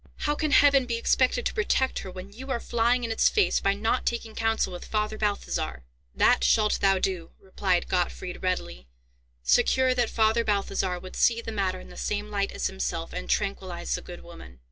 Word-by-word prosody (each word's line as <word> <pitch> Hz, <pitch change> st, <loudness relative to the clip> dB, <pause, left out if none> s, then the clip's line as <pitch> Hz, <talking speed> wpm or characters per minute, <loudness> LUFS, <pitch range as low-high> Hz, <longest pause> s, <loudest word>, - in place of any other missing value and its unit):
"How 295 Hz, -, +1 dB
can 305 Hz, +1 st, -1 dB
Heaven 275 Hz, -2 st, +5 dB
be 235 Hz, -, -1 dB
expected 255 Hz, -, +1 dB
to -, -, 0 dB
protect 390 Hz, -, +1 dB
her 190 Hz, -, -7 dB
when 185 Hz, +2 st, -9 dB
you 260 Hz, +5 st, -10 dB
are 250 Hz, -3 st, -1 dB
flying 240 Hz, +2 st, +1 dB
in 230 Hz, -, -2 dB
its 225 Hz, -, +3 dB
face 420 Hz, -, +2 dB
by 195 Hz, 0 st, +1 dB
not 225 Hz, +5 st, 0 dB
taking 230 Hz, -2 st, -3 dB
counsel 225 Hz, -4 st, 0 dB
with 175 Hz, -, -7 dB
Father 215 Hz, 0 st, -2 dB
Balthazar?" 140 Hz, -, -2 dB, 0.3 s
"That -, -, +4 dB
shalt 215 Hz, -1 st, +3 dB
thou 195 Hz, -1 st, +4 dB
do," 185 Hz, -3 st, -2 dB
replied 190 Hz, -2 st, -1 dB
Gottfried, 180 Hz, 0 st, -2 dB
readily, 180 Hz, -, -3 dB, 0.6 s
secure 255 Hz, -, +3 dB
that 245 Hz, -2 st, +1 dB
Father 220 Hz, +1 st, +2 dB
Balthazar 195 Hz, -3 st, -1 dB
would 185 Hz, +1 st, -10 dB
see 230 Hz, -1 st, +3 dB
the 230 Hz, -, -6 dB
matter 190 Hz, -3 st, -1 dB
in -, -, -13 dB
the -, -, -13 dB
same 210 Hz, 0 st, -3 dB
light 200 Hz, -1 st, -1 dB
as -, -, -4 dB
himself, 65 Hz, -1 st, -3 dB
and -, -, -6 dB
tranquillize 65 Hz, -1 st, -2 dB
the -, -, -2 dB
good -, -, -10 dB
woman. 65 Hz, -1 st, -13 dB
210 Hz, 195 wpm, -26 LUFS, 185-235 Hz, 0.6 s, Heaven